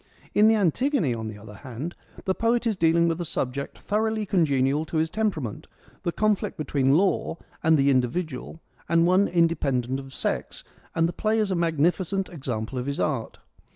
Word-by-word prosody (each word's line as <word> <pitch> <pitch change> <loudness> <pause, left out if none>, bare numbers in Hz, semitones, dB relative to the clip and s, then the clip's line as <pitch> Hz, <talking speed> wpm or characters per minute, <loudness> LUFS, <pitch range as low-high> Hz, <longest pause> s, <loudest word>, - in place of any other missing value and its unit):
In 210 +1 +6
the 225 - +5
Antigone, 210 - +1
on 110 -1 -4
the 110 -1 -7
other 105 0 -11
hand, 130 +8 -6 0.3
the 190 - +2
poet 230 +3 +1
is 225 -2 +1
dealing 170 -1 +3
with 165 +1 -1
a - - 0
subject 140 -3 -3
thoroughly 215 +1 -1
congenial 145 -6 +2
to 160 - -3
his 160 +1 +1
temperament, 175 - -2 0.3
the 170 - -1
conflict 215 +2 0
between 140 -2 +2
law 190 -2 +1 0.2
and 160 0 +4
the 140 0 +4
individual, 135 +4 -1 0.3
and 165 0 +4
one 185 +3 +4
independent 140 -7 +1
of 135 -1 -10
sex, - - -3 0.3
and 165 0 +3
the 170 - -4
play 215 +3 0
is 210 -3 +1
a - - +1
magnificent 175 +3 +1
example 130 -6 -4
of 125 - -4
his 140 - -2
art. 135 -7 -1
165 Hz, 180 wpm, -25 LUFS, 135-190 Hz, 0.3 s, In